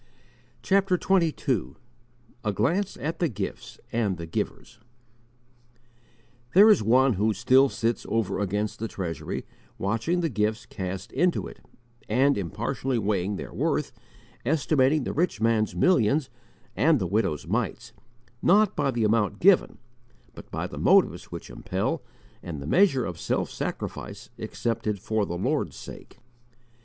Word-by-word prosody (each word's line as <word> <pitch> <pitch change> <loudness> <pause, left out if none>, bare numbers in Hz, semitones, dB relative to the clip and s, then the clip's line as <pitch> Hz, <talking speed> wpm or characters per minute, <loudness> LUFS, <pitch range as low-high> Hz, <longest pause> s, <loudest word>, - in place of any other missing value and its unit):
CHAPTER 195 -1 +3
XXII 150 - +1 0.7
A 105 - 0
GLANCE 165 - 0
AT 160 +6 -4
THE 170 - +1
GIFTS 100 -5 -6
AND 105 -6 0
THE 85 - -6
GIVERS 115 +7 -5 1.8
THERE 210 +3 +9
is 205 - +4
One 125 +4 +4
who 105 +2 +1
still 130 +6 +4
sits 115 -1 -2
over 110 -3 0
against 105 +1 -2
the 115 - -2
Treasury, 85 -8 -5 0.3
watching 115 - 0
the 165 - +1
gifts 110 -1 -1
cast 95 0 -6
into 180 0 +1
it, - - -10 0.5
and 135 +6 +3
impartially 115 +7 -2
weighing 100 -2 0
their - - -7
worth, - - -1 0.5
estimating 140 +1 +2
the - - -3
rich 165 - 0
man's 110 -1 +1
millions 140 - +2 0.4
and 160 +1 +4
the 100 - -1
widow's 95 -5 0
mites, - - -2 0.5
not 210 +2 +4
by 145 -2 +1
the 120 -3 0
amount 105 -1 +1
given, 190 0 +4 0.6
but - - -12
by - - -3
the - - -7
motives - - +3
which - - -9
impel - - -2 0.4
and 85 -4 -6
the 70 - -7
measure 140 - +3
of 85 -2 -6
self - - -1
sacrifice - - -5
accepted 115 -3 -2
for 110 +1 -1
the 85 - -3
Lord's 90 - -1
sake. - - -11
115 Hz, 140 wpm, -26 LUFS, 100-150 Hz, 1.8 s, THERE